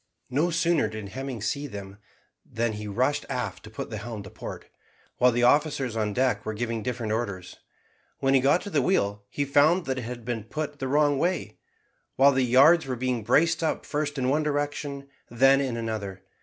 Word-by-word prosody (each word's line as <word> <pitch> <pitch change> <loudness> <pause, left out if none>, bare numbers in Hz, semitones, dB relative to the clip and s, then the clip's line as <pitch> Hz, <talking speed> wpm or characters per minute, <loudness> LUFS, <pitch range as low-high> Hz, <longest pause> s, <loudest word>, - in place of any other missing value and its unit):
No 150 +7 +2
sooner 165 -5 +2
did 105 -2 -7
Hemming 130 -2 -5
see 140 +6 -2
them 100 -4 -9 0.4
than 115 0 -2
he 105 0 -6
rushed 130 +8 0
aft 115 -9 -3
to - - -10
put 110 - -7
the 110 - -4
helm 110 -1 -6
to 95 - -11
port, - - -8 0.5
while 125 0 +5
the 120 +1 0
officers 135 -2 +2
on 105 -2 0
deck 130 +3 +1
were 110 - -4
giving 115 0 -2
different 115 -1 -3
orders. 100 -6 -4 0.6
When 135 0 +1
he 135 - +6
got 140 +7 +3
to 205 - -7
the 145 - +2
wheel 105 - +1
he 145 - -2
found 155 +6 +4
that 130 -1 -2
it 120 - -6
had 120 -1 -7
been 115 -3 -3
put 150 +3 -5
the 130 - -2
wrong 145 0 +3
way, 180 +4 -1 0.6
while 140 +1 +6
the 135 -1 +1
yards 135 +6 +5
were 130 - -2
being 125 -2 -2
braced 160 +8 +3
up 160 - -1
first 145 -1 -2
in 130 -1 0
one 145 +4 +2
direction, 145 -1 -3 0.2
then 135 +3 +4
in 130 -4 -2
another. 105 -5 -4
130 Hz, 200 wpm, -26 LUFS, 110-145 Hz, 0.6 s, he